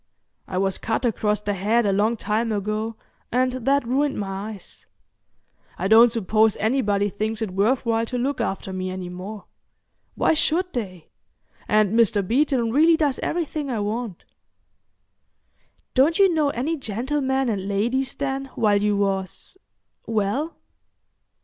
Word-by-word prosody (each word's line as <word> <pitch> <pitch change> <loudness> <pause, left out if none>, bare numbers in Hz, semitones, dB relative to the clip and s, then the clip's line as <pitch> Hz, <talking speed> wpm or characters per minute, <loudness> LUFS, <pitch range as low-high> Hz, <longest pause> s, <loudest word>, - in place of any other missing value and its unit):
"I 185 - -4
was 195 0 0
cut 225 +3 -1
across 210 -2 0
the 205 0 -1
head 215 +5 +1
a 200 - +2
long 215 +4 +1
time 220 +2 -1
ago, 215 +2 -2 0.4
and 255 +1 +2
that 265 +1 +1
ruined 275 +3 +1
my 195 +1 -4
eyes. 205 -4 -11 0.9
I 185 - -1
don't 225 +3 +7
suppose 220 -1 +2
anybody 205 -3 +1
thinks 215 +2 -3
it 220 -4 -3
worth 215 +8 +1
while 230 0 +1
to 250 - -3
look 270 +3 -1
after 190 0 -3
me 185 0 -3
any 185 -1 -5
more. 195 +4 -8 0.7
Why - - +3
should 345 +4 0
they?—and 205 0 -3
Mr. 215 -4 +2
Beeton 250 -1 +1
really 320 +5 +5
does 295 -5 0
everything 310 -4 -2
I 235 -4 -1
want." 210 -2 -4 1.7
"Don't 285 +6 +3
you 390 -3 +5
know 305 -3 +2
any 285 +6 -2
gentlemen 265 +3 -1
and 200 -4 -2
ladies, 240 +7 0
then, 275 -1 -2
while 205 -2 +2
you 205 -1 +1
was—well?" 205 - -3
225 Hz, 140 wpm, -23 LUFS, 205-265 Hz, 1.7 s, don't